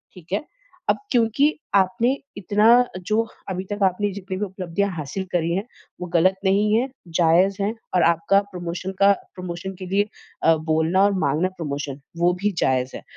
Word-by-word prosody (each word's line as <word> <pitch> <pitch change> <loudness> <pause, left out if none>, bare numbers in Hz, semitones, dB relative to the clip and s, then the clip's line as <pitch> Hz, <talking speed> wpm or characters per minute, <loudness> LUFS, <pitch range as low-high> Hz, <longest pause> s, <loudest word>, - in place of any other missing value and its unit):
ठीक 175 -2 -15
है। 200 - 0 0.5
अब - - +4
क्योंकि 235 +2 +3 0.3
आपने 225 +7 +3 0.2
इतना 205 +2 +1 0.4
जो 220 +3 +2 0.2
अभी 185 0 -3
तक 205 - -3
आपने 195 +2 +1
जितनी 190 -1 -5
भी 210 - -1
उपलब्धियाँ 190 0 -2
हासिल 155 +6 -4
करी 170 -1 0
है, 195 - -1 0.4
वो 180 - -3
ग़लत 185 +3 +4
नहीं 205 +2 +3
है, 245 +4 +2 0.2
जायज़ 175 +4 +3
है 210 +3 0 0.2
और 180 - +4
आपका 170 +4 +2
प्रमोशन 180 +1 -5
का 200 0 +6 0.2
प्रमोशन 180 +1 -6
के 185 - -6
लिए 200 +3 +1 0.4
अ, 165 - +6
बोलना 160 +4 +1
और 205 - +3
माँगना 155 +7 +1
प्रमोशन, 145 -3 -4 0.2
वो 175 +1 +3
भी 210 - +3
जायज़ 130 -1 +1
है। - - -8
185 Hz, 175 wpm, -23 LUFS, 170-200 Hz, 0.5 s, का